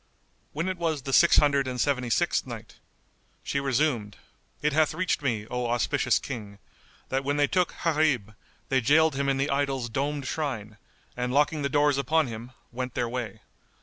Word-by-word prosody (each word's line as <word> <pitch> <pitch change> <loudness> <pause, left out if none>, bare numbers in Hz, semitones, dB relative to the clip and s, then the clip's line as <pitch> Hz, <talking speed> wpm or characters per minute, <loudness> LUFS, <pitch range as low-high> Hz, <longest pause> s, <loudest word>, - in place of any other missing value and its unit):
When 165 +5 -2
it 185 -1 -3
was 160 -5 -1
the 135 - -4
Six - - +6
Hundred 140 -2 +3
and 125 -1 -4
Seventy 125 -2 0
sixth 110 - +1
Night, - - -9 0.6
She 140 - -1
resumed, 135 -6 0 0.4
It 150 0 0
hath 155 0 +2
reached 185 -4 0
me, 115 -7 -1
O 125 +1 -3
auspicious 120 -1 +1
King, 105 -4 -6 0.5
that 135 +1 0
when 145 +1 0
they 145 - +4
took 180 +3 0
Gharib, 150 -10 +1 0.4
they 130 -1 +2
jailed 155 +5 +4
him 140 0 0
in 135 - +1
the 140 +1 0
idol's 135 -3 -1
domed 140 +4 -2
shrine; 120 -8 -3 0.4
and 125 0 -2
locking 150 +3 +2
the 140 - 0
doors 145 0 +3
upon 160 +3 +2
him, 115 +1 -7 0.2
went 125 0 -5
their 120 - 0
way. 120 -4 -5
135 Hz, 180 wpm, -27 LUFS, 120-150 Hz, 0.6 s, Six